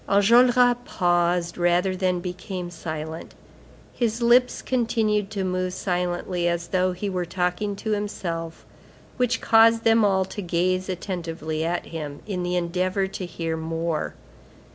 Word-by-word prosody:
Enjolras 245 +4 +5
paused 175 -2 +1
rather 175 +2 +2
than 185 -1 0
became 180 0 -5
silent; 160 -1 -6 0.6
his 230 -1 -1
lips 245 +1 +3
continued 220 -5 0
to 200 -3 -3
move 185 0 -1
silently, 180 -1 -1
as 170 0 -1
though 185 0 +2
he 185 +3 -4
were 185 -2 -1
talking 180 +4 -1
to 220 +2 -4
himself, 170 -6 -4 0.5
which 250 0 +1
caused 225 0 +5
them 225 0 +4
all 190 -2 +3
to 205 - -6
gaze 185 +1 0
attentively 165 -4 -4
at 170 +2 -1
him, 150 -3 -6
in 190 -4 -3
the 180 0 -1
endeavor 180 +2 0
to 190 -1 -6
hear 165 -1 -3
more. 165 0 -3
185 Hz, 140 wpm, -24 LUFS, 175-210 Hz, 0.6 s, Enjolras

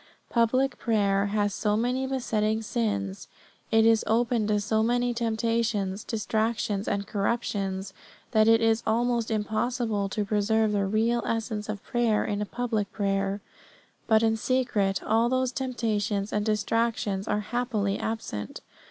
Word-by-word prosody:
Public 255 +3 +2
prayer 200 -3 +2
has 205 0 0
so 210 0 0
many 250 +3 0
besetting 220 -4 0
sins, 100 - -2 0.4
it 225 0 +4
is 225 -1 +4
open 230 -1 +2
to 210 -1 +2
so 220 +1 +1
many 245 +2 +1
temptations, 225 -3 -1
distractions, 220 -2 -1
and 200 0 -1
corruptions, 195 -3 -2 0.4
that 215 -1 +4
it 225 0 +5
is 225 0 +3
almost 235 +1 +1
impossible 220 -1 -1
to 210 +1 -2
preserve 215 +1 +2
the 200 -1 +1
real 225 +4 +1
essence 220 -2 -2
of 210 -2 -4
prayer 235 -3 +1
in 205 0 -1
public 225 -4 -2
prayer. 195 0 -1 0.7
But 220 0 +4
in 225 0 +2
secret 220 -6 0
all 225 +2 +2
those 255 0 +1
temptations 220 -6 -2
and 210 - +1
distractions 215 -2 0
are 210 - 0
happily 215 -3 -1
absent. 105 - -4
220 Hz, 135 wpm, -27 LUFS, 205-235 Hz, 0.7 s, it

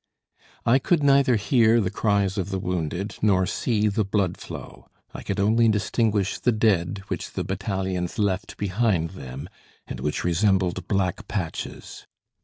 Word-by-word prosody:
I 125 +3 +5
could 165 +1 +1
neither 140 -2 +5
hear 115 +1 +3
the 95 -4 0
cries 100 -2 +1
of 95 0 -2
the 95 - -2
wounded, 90 +1 -3
nor 95 -3 +3
see 105 +2 0
the 105 +1 +1
blood 100 -3 0
flow. - - -10 0.3
I - - -7
could 100 - -3
only 110 +3 +4
distinguish 105 -1 0
the 125 - +2
dead 100 -4 +1
which - - -4
the - - -2
battalions 95 -1 -3
left 100 -4 -1
behind 100 -4 0
them, 70 -4 -8 0.4
and - - -7
which 75 - -2
resembled 90 +1 +1
black 95 0 -1
patches. 90 -6 -5
100 Hz, 150 wpm, -24 LUFS, 90-110 Hz, 0.4 s, I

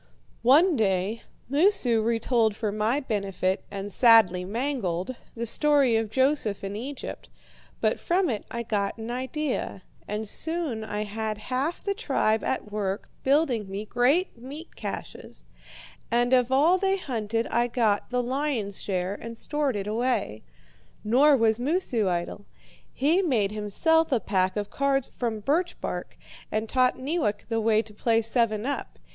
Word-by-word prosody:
One 305 +9 +5
day 200 0 0 0.3
Moosu 280 - +3
retold 225 -1 +1
for 215 -1 -2
my 215 +6 0
benefit, 195 -6 -1
and 200 0 -6
sadly 220 -7 +6
mangled, 220 -2 -2 0.2
the 235 0 -3
story 280 -1 +3
of 225 -1 0
Joseph 260 -5 +1
in 195 +1 -4
Egypt, 265 +6 -7 0.5
but - - +1
from 360 +2 +1
it 220 -6 -2
I 235 0 -4
got 205 -2 -1
an 225 +1 -5
idea, 260 -5 -3 0.2
and 210 +1 -3
soon 320 -4 -2
I 210 -1 -3
had 215 +1 -3
half 260 +9 -3
the 400 - 0
tribe 220 - 0
at 210 -5 -2
work 200 0 -3
building 265 -7 +2
me 200 +2 -5
great 275 - +2
meat 275 +8 -10
caches. 200 - -7 0.6
And 240 +2 +2
of 250 0 +3
all 315 +8 +4
they 390 0 +1
hunted 230 - -2
I 240 0 +2
got 225 -4 +1
the 250 0 0
lion's 250 -6 -2
share 185 -1 -2
and 230 +2 -8
stored 290 -1 -1
it 200 -1 -3
away. 215 - -1 0.6
Nor 275 +6 +5
was 225 -1 +2
Moosu 255 - 0
idle. 175 +3 -3 0.4
He 315 +8 +2
made 230 - +1
himself 300 - +1
a 255 - +3
pack 190 -1 0
of 205 -1 -3
cards 275 -1 +1
from 225 -3 -3
birch 335 - 0
bark, - - -5 0.3
and 220 +1 -1
taught 255 +1 +2
Neewak 260 -8 -2
the 225 -1 0
way 220 0 +3
to 215 - -12
play 225 +1 +1
seven 225 -1 +1
up. 285 - -4
230 Hz, 150 wpm, -26 LUFS, 210-275 Hz, 0.6 s, sadly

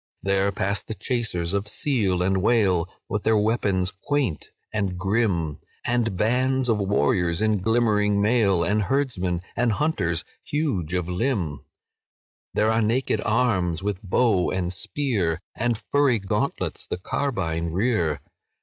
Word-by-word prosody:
"There 100 0 +2
pass 100 +1 -1
the 110 - -6
chasers 105 -10 -2
of 100 +1 -1
seal 105 -8 0
and 95 0 +1
whale, 95 -6 +2 0.2
With 105 - -2
their 110 +1 +3
weapons 100 -4 +1
quaint 125 - -2 0.2
and 100 -4 -1
grim, 95 -6 0 0.3
And 120 -5 0
bands 130 +4 +1
of 110 -2 +2
warriors 90 -4 +1
in 110 -1 +2
glimmering 105 -1 +2
mail, 100 -5 +3
And 105 +5 +1
herdsmen 95 -8 -1
and 120 -2 +2
hunters 100 - 0 0.2
huge 105 - -1
of 90 -2 -1
limb— 90 - -1 0.9
There 110 +1 +3
are 110 +1 +2
naked 115 0 +1
arms, 95 -8 +1
with 100 -2 -2
bow 100 -1 +2
and 90 -1 -1
spear, 100 - -1
And 120 0 0
furry 140 +2 +2
gauntlets 95 -2 -2
the - - -3
carbine 90 -7 -2
rear. 90 -5 0
105 Hz, 135 wpm, -24 LUFS, 90-120 Hz, 0.9 s, their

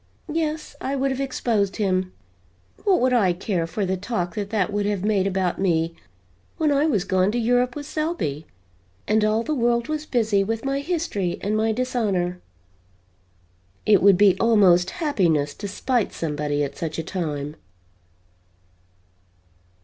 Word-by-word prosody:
Yes, 310 -1 -2
I 270 +1 -2
would 270 0 0
have 265 +1 -2
exposed 225 -7 0
him! 185 -3 0 0.7
What 390 -3 +4
would 255 0 +3
I 200 -7 +3
care 175 -2 -2
for 195 +5 -2
the 190 0 0
talk 180 -3 -3
that 200 0 -4
that 205 -2 0
would 205 0 0
have 205 -3 -1
made 200 -3 +2
about 190 -2 -1
me 165 -3 +1 0.6
when 310 -2 +2
I 285 +2 +3
was 210 - +1
gone 190 0 +2
to - - 0
Europe 245 +1 +1
with 290 -1 -6
Selby 305 - -3 0.6
and 215 0 +3
all 215 +2 +2
the 310 - -2
world 235 -1 +1
was 310 0 -3
busy 215 -5 +2
with 225 +4 -3
my 275 0 0
history 280 - -2
and 210 +2 -1
my 220 +1 +2
dishonor? 210 -7 -1 1.4
It 205 -3 +5
would 195 -1 +6
be 200 -2 +5
almost 190 -6 +4 0.2
happiness 160 - +1
to 205 - -6
spite 235 +3 -1
somebody 150 -2 -2
at 140 - -4
such 160 -2 -4
a 165 - -2
time." 150 -4 -4
205 Hz, 155 wpm, -23 LUFS, 180-250 Hz, 1.4 s, would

